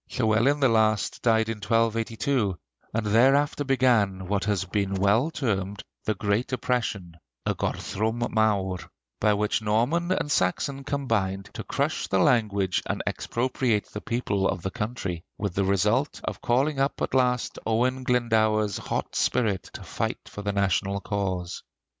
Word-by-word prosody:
Llywelyn 125 +5 +2
the 135 - +6
Last 110 -2 +2
died 110 -2 +3
in 115 -1 -3
1282, 115 0 0 0.3
and 110 0 -1
thereafter 135 +7 +3
began 120 -9 +2
what 100 +1 0
has 100 -2 0
been 100 +1 -1
well 100 +9 +3
termed 100 - -2 0.2
"The 110 - 0
Great 100 +6 0
Oppression" 110 -9 -2 0.3
(y - - +1
Gorthrwm 110 +3 -2
Mawr), 100 -4 +1 0.4
by 105 0 +3
which 105 +2 0
Norman 120 - +1
and 150 -5 0
Saxon 135 +8 0
combined 105 -9 -1
to - - -5
crush - - -1
the 95 - +1
language 100 -3 +2
and - - -2
expropriate 120 -3 -1
the 105 - -6
people 100 -5 0
of 85 - -3
the 95 - -2
country, 105 -7 -4
with 100 -4 -2
the 100 +1 +1
result 105 +9 +1
of - - -4
calling 135 +4 +1
up 135 +1 0
at - - -2
last 125 -2 +1
Owen 125 +4 +1
Glendower's 110 -4 +2
hot - - -3
spirit 105 -7 0
to - - -8
fight - - -3
for 105 - -8
the 100 0 -1
national 100 0 0
cause. 95 -4 -3
110 Hz, 150 wpm, -26 LUFS, 100-125 Hz, 0.4 s, the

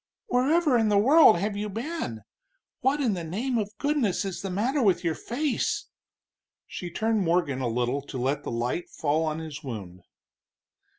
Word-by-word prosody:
"Wherever 285 -1 +3
in 220 -1 +2
the 205 - +3
world 275 - +7
have 200 +3 -2
you 210 +1 -3
been? 225 - -4 0.6
What 270 +4 +1
in 245 -7 +1
the 175 -3 -4
name 230 +9 -1
of 205 0 -5
goodness 275 -10 0
is 190 -2 -4
the 195 - -4
matter 240 +10 0
with 190 -6 +3
your 165 -2 +1
face?" 265 - -2 0.8
She 175 - -6
turned 220 +4 0
Morgan 165 -7 +1
a 125 - 0
little 125 +4 0
to 135 - -6
let 135 +4 0
the - - -6
light 120 +8 -2
fall 155 +1 0
on 155 0 -2
his 160 -1 -7
wound. 100 -9 -7
195 Hz, 175 wpm, -27 LUFS, 150-240 Hz, 0.8 s, world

